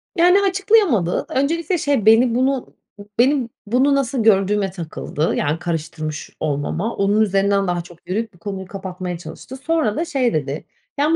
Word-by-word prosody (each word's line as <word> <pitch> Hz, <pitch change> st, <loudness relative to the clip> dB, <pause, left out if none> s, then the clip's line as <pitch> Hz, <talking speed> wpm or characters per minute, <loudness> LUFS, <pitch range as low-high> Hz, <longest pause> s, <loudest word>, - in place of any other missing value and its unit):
Yani, 360 Hz, +3 st, +5 dB
açıklayamadı. 375 Hz, -, +2 dB
Öncelikle, 330 Hz, +6 st, 0 dB
şey, 285 Hz, -8 st, 0 dB
beni 230 Hz, +2 st, +5 dB
bunu 260 Hz, +1 st, 0 dB, 0.5 s
benim 255 Hz, -1 st, +3 dB, 0.2 s
bunu, 260 Hz, +6 st, +3 dB
nasıl 265 Hz, -3 st, 0 dB
gördüğüme 200 Hz, -2 st, +3 dB
takıldı, 160 Hz, -3 st, -3 dB
yani, 150 Hz, +3 st, 0 dB
karıştırmış 155 Hz, -2 st, -4 dB
olmama. 155 Hz, +9 st, -2 dB
Onun 205 Hz, +2 st, +2 dB
üzerinden 195 Hz, -1 st, +2 dB
daha 175 Hz, -1 st, 0 dB
çok 175 Hz, 0 st, -14 dB
yürüyüp 220 Hz, +3 st, -2 dB
bu 175 Hz, -, -22 dB
konuyu 190 Hz, +1 st, -6 dB
kapatmaya 185 Hz, -2 st, -5 dB
çalıştı. 165 Hz, +10 st, -9 dB
Sonra 290 Hz, -7 st, 0 dB
da 335 Hz, -, -1 dB
şey 265 Hz, -7 st, 0 dB
dedi: 145 Hz, -1 st, -2 dB, 0.3 s
“Yani, 310 Hz, +3 st, +3 dB
210 Hz, 150 wpm, -20 LUFS, 175-275 Hz, 0.5 s, Yani